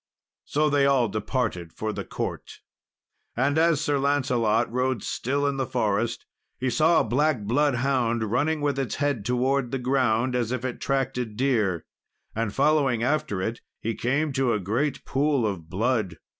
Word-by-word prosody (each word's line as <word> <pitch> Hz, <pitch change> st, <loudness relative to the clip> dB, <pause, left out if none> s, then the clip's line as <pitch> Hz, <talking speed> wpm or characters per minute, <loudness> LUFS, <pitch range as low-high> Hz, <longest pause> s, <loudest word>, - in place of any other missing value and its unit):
So 150 Hz, +1 st, +1 dB
they 145 Hz, -2 st, +3 dB
all 130 Hz, -5 st, +3 dB
departed 105 Hz, -5 st, -2 dB
for 110 Hz, 0 st, -3 dB
the -, -, -4 dB
court. -, -, -5 dB, 0.8 s
And 140 Hz, +3 st, +2 dB
as 165 Hz, -3 st, +3 dB
Sir 145 Hz, -2 st, +1 dB
Lancelot 125 Hz, -5 st, +1 dB
rode 125 Hz, -2 st, 0 dB
still 140 Hz, +3 st, -1 dB
in 140 Hz, -1 st, 0 dB
the 135 Hz, -2 st, -1 dB
forest, 110 Hz, +3 st, -1 dB, 0.3 s
he 130 Hz, 0 st, -1 dB
saw 160 Hz, +4 st, +4 dB
a -, -, +1 dB
black 145 Hz, -1 st, +1 dB
bloodhound, 125 Hz, -1 st, +1 dB
running 150 Hz, +5 st, +1 dB
with 145 Hz, -2 st, 0 dB
its 130 Hz, -6 st, -2 dB
head 140 Hz, -7 st, -1 dB
towards 125 Hz, +3 st, +1 dB
the 135 Hz, -, -2 dB
ground, 125 Hz, -1 st, +1 dB
as 120 Hz, -2 st, 0 dB
if 130 Hz, 0 st, -2 dB
it 125 Hz, -, -4 dB
tracked 135 Hz, -2 st, 0 dB
a 125 Hz, -, 0 dB
deer. 110 Hz, -6 st, 0 dB, 0.5 s
And 110 Hz, -2 st, -1 dB
following 135 Hz, -3 st, +2 dB
after 120 Hz, -8 st, 0 dB
it, 115 Hz, +3 st, -3 dB, 0.2 s
he 115 Hz, -, -2 dB
came 140 Hz, +6 st, 0 dB
to 130 Hz, -3 st, +1 dB
a 105 Hz, -, 0 dB
great 120 Hz, +9 st, -1 dB
pool 140 Hz, -3 st, +1 dB
of 90 Hz, -6 st, -4 dB
blood. 105 Hz, -2 st, 0 dB
125 Hz, 170 wpm, -25 LUFS, 115-140 Hz, 0.8 s, saw